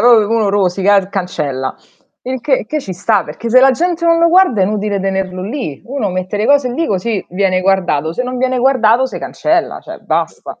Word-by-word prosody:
uno 225 -2 +4
rosica 195 0 +2
e 195 - +5
r 185 - -10
cancella. 145 -9 -3 0.5
Il 260 0 -4
che 265 -4 0
che 305 +5 -2
ci 190 - -7
sta, 200 +1 +1
perché 185 +11 -6
se 255 +3 +5
la 270 +1 +6
gente 340 +4 -1
non 335 0 +4
lo 335 - +4
guarda 355 - +4
è - - +4
inutile 205 0 -2
tenerlo 190 -1 -2
lì. 210 - -5
Uno 245 -6 -3
mette 185 +2 -3
le 210 - 0
cose 280 -3 +3
lì, 330 +5 -1
così 200 0 -2
viene 185 0 +1
guardato, 180 -5 0
se 250 - -2
non 255 0 -4
viene 255 0 0
guardato 250 -1 +3
se - - -7
cancella, 330 +2 -1
cioè - - -10
basta. - - -3
215 Hz, 210 wpm, -15 LUFS, 190-260 Hz, 0.5 s, la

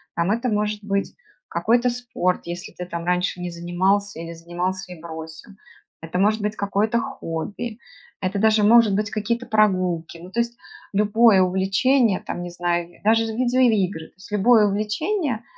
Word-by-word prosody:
Там, 170 +3 +1
это 235 +3 0
может 210 0 -1
быть 200 -1 -2 0.3
какой-то 240 +2 +2
спорт, 240 -7 -1
если 175 +1 -6
ты, 180 - -6
там, 170 -1 -5
раньше 180 +1 0
не 180 0 -4
занимался 185 +3 0
или 165 0 -6
занимался 175 +3 -4
и 175 - -9
бросил. 160 +4 -9 0.5
Это 165 +2 -4
может 215 +2 +2
быть 210 +1 -2
какое-то 205 +3 +1
хобби, 225 -1 -5 0.4
это 195 +2 -1
даже 220 0 +4
может 225 -1 +6
быть 210 0 -1
какие-то 230 +3 -2
прогулки, 185 -7 +1
ну, 175 +2 -11
то 235 - -2
есть 235 0 -4 0.4
любое 210 0 +5
увлечение, 195 +5 +2
там, 175 - -6
не 175 - -5
знаю, 175 0 -1
даже 225 +2 +4
видеоигры, 225 -7 +1
то - - -36
есть 190 +2 -15
любое 210 +1 +5
увлечение, 220 - -1
205 Hz, 160 wpm, -23 LUFS, 180-225 Hz, 0.5 s, может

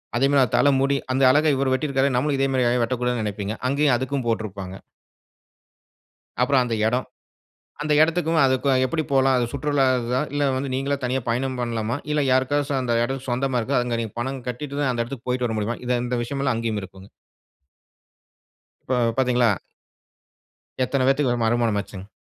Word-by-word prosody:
அதே 130 +3 +3
மாரி 140 -1 +4
அ - - -8
தலமுடி. 140 0 +3
அந்த 130 +1 +1
அழகா 150 +4 +4
இவரு 135 0 0
வெட்டிருக்காரே, 135 0 +1
நாமளும் 140 +3 +1
இதே 135 0 +2
மாரி 130 -2 +1
ஏன் 125 0 +1
வெட்டக்கூடாதுன்னு 125 -1 -1
நினைப்பீங்க. 105 0 -3 0.2
அங்கேயும் 140 -1 +2
அதுக்கும் 130 0 -3
போட்ருப்பாங்க. 100 -4 -3 1.6
அப்புறம் 130 +1 +3
அந்த 120 -2 -2
எடம். 125 +3 0 0.8
அந்த 150 0 0
எடத்துக்கும் 165 0 +2
அதுக்கும் 130 0 +2
எப்படி 160 +4 -1
போலாம்? 135 -1 +3
அது 120 - +1
சுற்றுலா 140 0 +1 0.2
இதா, 125 +2 0
இல்லை 145 0 +1
வந்து, 135 +1 -3
நீங்களே 140 +2 -1
தனியா 130 +1 -1
பயணம் 130 +2 -1
பண்ணலாமா? 115 +1 -2
இல்லை. 150 -1 +1
யாருக்காச்சம் 135 +2 +1
அந்த 120 -2 0
எடம் 135 +1 -5
சொந்தமா 125 +1 0
இருக்கோ? 135 +5 -2
அங்க 120 -1 -2
நீங்க 110 -3 -6
பணம் 135 +1 -4
கட்டிட்டு 140 +3 -5
தான், 145 -2 +1
அந்த 120 -1 -1
எடத்திற்கு 125 0 -9
போய்ட்டு 125 0 0
வர 110 - -3
முடியுமா? 110 +3 -2
இத 125 0 +2
இந்த 125 0 -2
விஷயமல்லாம் 135 0 -1
அங்கேயுமிருக்குங்க. 100 -4 -5 1.8
இப்போ 130 - -1 0.2
பாத்தீங்களா? 125 -3 +3 1.3
எத்தனை 130 +1 0
பேத்துக்கு 135 -1 +2
ஒரு 120 - -2
மறுமணம் 115 -1 +1
ஆச்சுங்க? 100 -1 -8
130 Hz, 165 wpm, -23 LUFS, 120-140 Hz, 1.8 s, மாரி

